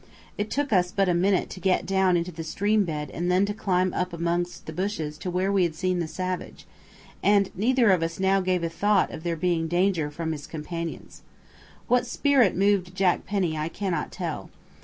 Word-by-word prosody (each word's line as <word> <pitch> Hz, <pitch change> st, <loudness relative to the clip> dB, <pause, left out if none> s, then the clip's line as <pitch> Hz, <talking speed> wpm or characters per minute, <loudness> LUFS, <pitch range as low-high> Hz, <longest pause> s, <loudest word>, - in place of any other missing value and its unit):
It 205 Hz, +1 st, -3 dB
took 285 Hz, -3 st, -1 dB
us 180 Hz, -2 st, +3 dB
but 195 Hz, -1 st, +1 dB
a -, -, +3 dB
minute 185 Hz, +2 st, +1 dB
to -, -, -7 dB
get 185 Hz, 0 st, +1 dB
down 190 Hz, -2 st, +3 dB
into 170 Hz, +1 st, -2 dB
the 165 Hz, -1 st, -6 dB
stream 205 Hz, +6 st, +1 dB
bed 150 Hz, -4 st, -4 dB
and 175 Hz, +2 st, -1 dB
then 185 Hz, +2 st, +4 dB
to 205 Hz, -, -2 dB
climb 185 Hz, -3 st, 0 dB
up 180 Hz, -1 st, -2 dB
amongst 170 Hz, +1 st, -2 dB
the -, -, -7 dB
bushes 180 Hz, -6 st, -3 dB
to 185 Hz, -, -4 dB
where 185 Hz, +2 st, 0 dB
we 200 Hz, -1 st, +3 dB
had 170 Hz, -3 st, +1 dB
seen 185 Hz, +1 st, 0 dB
the 170 Hz, -, -1 dB
savage, 185 Hz, +2 st, -5 dB, 0.6 s
and 200 Hz, -1 st, +3 dB
neither 235 Hz, +2 st, +3 dB
of 180 Hz, -3 st, +3 dB
us 165 Hz, +1 st, -3 dB
now 190 Hz, 0 st, +3 dB
gave 185 Hz, -2 st, 0 dB
a -, -, +1 dB
thought 205 Hz, +4 st, +2 dB
of -, -, -7 dB
there 170 Hz, 0 st, -2 dB
being 165 Hz, -1 st, 0 dB
danger 175 Hz, -2 st, +1 dB
from 160 Hz, +2 st, -4 dB
his 150 Hz, -2 st, -6 dB
companions. 165 Hz, +1 st, -6 dB, 0.7 s
What 250 Hz, 0 st, +2 dB
spirit 260 Hz, -5 st, +3 dB
moved 195 Hz, -2 st, +1 dB
Jack 185 Hz, -2 st, +1 dB
Penny 185 Hz, -5 st, 0 dB
I 155 Hz, +1 st, -2 dB
cannot 175 Hz, -5 st, -3 dB
tell. -, -, -5 dB
180 Hz, 205 wpm, -26 LUFS, 170-195 Hz, 0.7 s, then